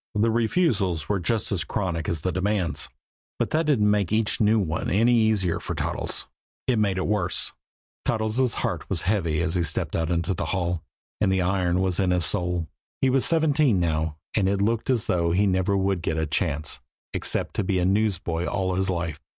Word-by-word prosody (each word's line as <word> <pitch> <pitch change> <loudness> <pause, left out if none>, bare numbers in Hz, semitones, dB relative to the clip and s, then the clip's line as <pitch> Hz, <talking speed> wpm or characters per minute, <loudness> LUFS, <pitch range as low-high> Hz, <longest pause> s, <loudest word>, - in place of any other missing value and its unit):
The 110 +2 +3
refusals 110 - +1
were 100 -2 0
just 110 +6 -1
as 90 -4 +1
chronic 85 -6 -2
as 80 -3 -2
the 90 - -1
demands. 95 -5 -1 0.5
But - - -1
that 160 0 +1
didn't 105 -8 +3
make 100 -3 +1
each 110 0 +1
new 110 +1 +4
one 80 -6 -1
any 115 +5 +3
easier 110 -6 +2
for - - -5
Toddles. - - -1 0.4
It 120 -4 +2
made 100 -3 +1
it 95 - -1
worse. 100 -4 +1 0.5
Toddles' 110 0 -1 0.2
heart - - -3
was - - 0
heavy 85 -6 +1
as 80 - 0
he 90 - +1
stepped 85 - -1
out 80 0 0
into 85 +2 0
the - - -3
hall, 90 -3 -1 0.4
and 100 -2 +3
the 95 -1 +2
iron 90 -1 +1
was 95 -2 0
in 95 -2 +2
his 90 -2 +2
soul. 90 -2 -1 0.3
He 130 - +3
was 135 0 +2
seventeen 150 - +3
now, 80 -2 -1 0.2
and 95 -3 +2
it 100 0 0
looked 115 +4 0
as 120 -4 +1
though 85 -1 +1
he 100 +3 +3
never 95 +1 +1
would 95 -2 0
get 80 -1 -1
a 80 - +1
chance 75 0 -1 0.3
except - - -1
to - - +1
be 95 0 0
a 90 - +1
newsboy 95 -4 0
all 95 0 -1
his 95 +1 0
life. 85 -4 -2
95 Hz, 200 wpm, -25 LUFS, 85-105 Hz, 0.5 s, new